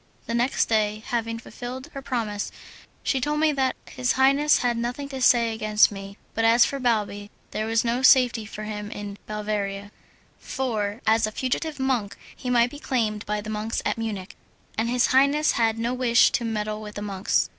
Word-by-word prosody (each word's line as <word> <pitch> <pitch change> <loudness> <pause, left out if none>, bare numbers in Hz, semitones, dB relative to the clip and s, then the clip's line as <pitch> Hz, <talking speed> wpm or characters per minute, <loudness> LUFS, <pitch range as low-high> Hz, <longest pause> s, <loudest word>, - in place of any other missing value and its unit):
The 230 - -4
next 240 +3 +2
day, 215 -1 0
having 230 -1 -2
fulfilled 250 +3 -8
her 275 - -6
promise, 225 -6 -3 0.5
she 265 - 0
told 300 +3 0
me 310 0 +4
that 265 -2 0
his 250 -1 -1
highness 275 +3 +4
had 240 -1 +2
nothing 245 +4 -3
to 265 -2 -6
say 235 -2 +4
against 215 -1 +3
me, 195 0 -8 0.2
but 225 - -1
as 230 +2 +6
for 275 - -3
Balbi 210 -4 -1 0.2
there 215 +1 -2
was 225 +1 +1
no 240 +2 0
safety 250 -3 +5
for 215 0 -8
him 210 -1 -5
in 205 -1 -7
Bavaria, 205 -1 -3 0.5
for 220 -4 -3
as 220 0 +3
a - - -5
fugitive 275 +6 -2
monk 250 -6 -1 0.2
he 250 - -5
might 240 0 +3
be 290 - -9
claimed 220 -7 -1
by 210 0 -1
the 215 +1 -6
monks 215 +1 -3
at - - -1
Munich, 205 -4 -5 0.4
and 225 +2 0
his 245 0 +3
highness 280 +3 +4
had 225 -1 +1
no 235 +2 -1
wish 250 -2 +4
to 275 -3 0
meddle 215 -1 -2
with 210 -1 -9
the 205 - -5
monks. 195 -2 0
230 Hz, 190 wpm, -25 LUFS, 210-255 Hz, 0.5 s, as